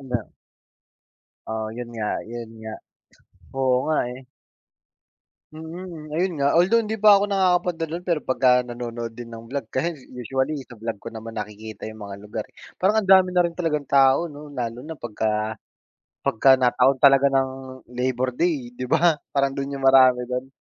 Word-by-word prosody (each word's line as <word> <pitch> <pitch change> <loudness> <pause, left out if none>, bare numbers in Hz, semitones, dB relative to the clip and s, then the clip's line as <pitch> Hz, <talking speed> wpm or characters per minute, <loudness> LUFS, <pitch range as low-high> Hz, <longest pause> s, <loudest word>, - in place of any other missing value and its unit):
ano 125 -3 -2 1.3
Oo, 110 0 -3
'yon 120 -1 -6
nga, 105 -2 -2 0.2
'yon 115 -1 -7
nga, 110 0 -7 0.9
oo 130 -1 +3
nga 155 0 +1
eh. 130 - -10 1.3
Mm, 160 0 -8
ayun 175 +4 0
nga, 140 +3 +3
although 210 +7 +4
hindi 220 0 -3
pa 205 -1 +6
ako 205 - -1
nakakapunta 180 -4 +1
do'n, 170 +3 -5
pero 175 -3 0
pagka 125 -1 +3
nanonood 120 -1 -6
din 120 0 -9
ng 115 0 -10
vlog, 130 -2 -5
kasi 170 +6 -1 0.2
usually 130 +4 -2
sa - - -13
vlog 115 -1 -5
ko 115 +3 -9
naman 110 0 -8
nakikita 105 0 -7
yung 110 0 -9
mga 100 -1 -7
lugar 105 +2 -6
eh. - - -32 0.3
Parang, 205 +4 +3
ang - - -11
dami 190 -1 +7
na 180 -1 +3
rin 170 - -3
talagang 155 -4 -1
tao, 135 +4 +4
'no, 150 -2 -10
lalo 120 -3 -4
na 160 +2 -8
pagka, 110 -2 -2 0.7
pagka 130 +4 +5
nataon 130 +1 +3
talaga 135 0 +6
ng, 130 -1 -2
Labor 125 +1 -1
Day, 140 -4 -1
'di 125 +1 -6
ba, 165 -1 +3 0.2
parang 140 -1 +2
do'n 140 +1 -4
yung 135 - -7
marami 130 -2 +6
do'n? 125 +1 -4
130 Hz, 170 wpm, -23 LUFS, 120-160 Hz, 1.3 s, dami